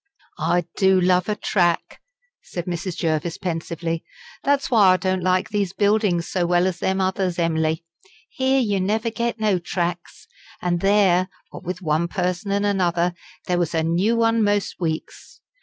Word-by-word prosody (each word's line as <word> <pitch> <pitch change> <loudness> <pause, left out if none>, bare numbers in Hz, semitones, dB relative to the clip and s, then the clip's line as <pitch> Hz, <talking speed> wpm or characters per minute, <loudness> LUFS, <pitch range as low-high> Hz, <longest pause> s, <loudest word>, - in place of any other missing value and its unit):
"I 175 -1 +1
do 190 -1 +4
love 180 +1 +2
a 210 - +1
track!" 175 -5 0 0.4
said 175 -1 -6
Mrs. 175 0 -4
Jervis, 160 0 -1
pensively. 165 -2 -3 0.4
"That's 280 0 +1
why 205 -6 +6
I - - +2
don't 185 0 -1
like 185 +1 +1
these 200 -3 -1
buildings 200 -4 +1
so 175 -2 0
well 175 +1 +3
as 185 -2 -1
them 190 0 0
others, 185 -1 0
Em'ly. 160 -1 0 0.4
Here 265 +1 +1
you 205 -6 +1
never 220 +4 0
get 235 0 -2
no 210 -4 +2
tracks; 175 0 -4 0.3
and 175 -1 0
there, 195 -2 +3 0.2
what - - -9
with 180 +2 -5
one 160 +1 +1
person 180 +1 -2
and 200 +1 +1
another, 180 -3 +1 0.3
there 180 -1 0
was 170 -1 -1
a 160 - +1
new 180 +8 +1
one 230 -1 +2
most 205 -1 0
weeks. 160 -3 -5
185 Hz, 165 wpm, -22 LUFS, 175-205 Hz, 0.4 s, why